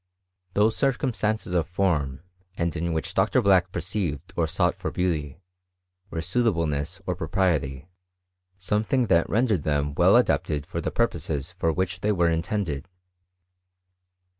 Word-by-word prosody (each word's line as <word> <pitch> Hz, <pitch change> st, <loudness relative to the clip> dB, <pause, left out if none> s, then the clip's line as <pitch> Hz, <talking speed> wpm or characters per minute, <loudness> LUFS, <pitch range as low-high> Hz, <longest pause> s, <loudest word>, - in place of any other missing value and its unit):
Those 110 Hz, +2 st, +3 dB
circumstances 120 Hz, -7 st, 0 dB
of 85 Hz, -3 st, +1 dB
form, 85 Hz, -8 st, 0 dB, 0.4 s
and 85 Hz, 0 st, -1 dB
in 85 Hz, +1 st, -1 dB
which 80 Hz, -1 st, -3 dB
Dr. -, -, +3 dB
Black 95 Hz, -2 st, +3 dB
perceived 85 Hz, -2 st, -3 dB
or 85 Hz, -2 st, +1 dB
sought 80 Hz, -, +1 dB
for -, -, -4 dB
beauty, 80 Hz, -6 st, -1 dB, 0.7 s
were 80 Hz, -, -3 dB
suitableness 85 Hz, -6 st, 0 dB
or 90 Hz, -, 0 dB
propriety: 80 Hz, -5 st, -1 dB, 0.7 s
something 110 Hz, +7 st, +1 dB
that 85 Hz, 0 st, +3 dB
rendered 110 Hz, -6 st, +2 dB
them 75 Hz, -1 st, 0 dB
well -, -, +5 dB
adapted 75 Hz, -2 st, +2 dB
for -, -, -4 dB
the -, -, -1 dB
purposes 75 Hz, +2 st, -1 dB
for 85 Hz, -2 st, 0 dB
which 90 Hz, +2 st, -2 dB
they 105 Hz, +3 st, +1 dB
were 85 Hz, -4 st, +2 dB
intended. 80 Hz, -3 st, -2 dB
85 Hz, 135 wpm, -25 LUFS, 80-100 Hz, 0.7 s, well